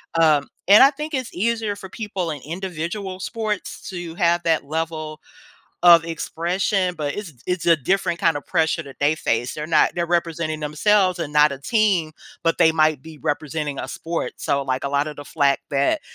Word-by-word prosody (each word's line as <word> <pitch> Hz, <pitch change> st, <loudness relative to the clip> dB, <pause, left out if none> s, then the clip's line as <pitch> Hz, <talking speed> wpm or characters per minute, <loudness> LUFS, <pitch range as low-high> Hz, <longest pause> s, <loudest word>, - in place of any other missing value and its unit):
Um, 155 Hz, -3 st, +3 dB, 0.2 s
and 205 Hz, +5 st, +9 dB
I 270 Hz, -, +8 dB
think 300 Hz, +2 st, -6 dB
it's 260 Hz, -3 st, -3 dB
easier 220 Hz, +1 st, -1 dB
for 195 Hz, -, -9 dB
people 195 Hz, -6 st, -4 dB
in 145 Hz, -3 st, -6 dB
individual 185 Hz, +4 st, -5 dB
sports 215 Hz, 0 st, -4 dB
to 175 Hz, -3 st, -6 dB
have 175 Hz, 0 st, +2 dB
that 160 Hz, -3 st, +1 dB
level 155 Hz, 0 st, -4 dB, 0.6 s
of 170 Hz, -1 st, +8 dB
expression, 180 Hz, +3 st, -1 dB
but 150 Hz, -3 st, -3 dB
it's 200 Hz, -7 st, -7 dB
it's 180 Hz, -1 st, -2 dB
a 170 Hz, -1 st, +6 dB
different 170 Hz, +4 st, 0 dB
kind 165 Hz, -2 st, +2 dB
of 145 Hz, -, -14 dB
pressure 160 Hz, -1 st, +1 dB
that 140 Hz, -3 st, -12 dB
they 145 Hz, +2 st, +3 dB
face. 120 Hz, -5 st, -1 dB
They're 150 Hz, 0 st, -5 dB
not 160 Hz, -1 st, +3 dB
they're 170 Hz, -1 st, -1 dB
representing 170 Hz, -2 st, -1 dB
themselves 185 Hz, +5 st, +2 dB
and 165 Hz, -3 st, -3 dB
not 150 Hz, 0 st, +5 dB
a 140 Hz, -, -6 dB
team, 190 Hz, -, +1 dB, 0.3 s
but 165 Hz, 0 st, +1 dB
they 160 Hz, -, +5 dB
might 155 Hz, -3 st, +2 dB
be 160 Hz, -1 st, -12 dB
representing 145 Hz, +1 st, -3 dB
a -, -, -4 dB
sport. 165 Hz, 0 st, -4 dB
So, 140 Hz, 0 st, 0 dB
like, 130 Hz, -1 st, -2 dB
a -, -, 0 dB
lot 140 Hz, +1 st, +1 dB
of 150 Hz, -, -8 dB
the 145 Hz, -, -9 dB
flack 140 Hz, -3 st, +1 dB
that 140 Hz, -, +1 dB
165 Hz, 195 wpm, -22 LUFS, 150-185 Hz, 0.6 s, and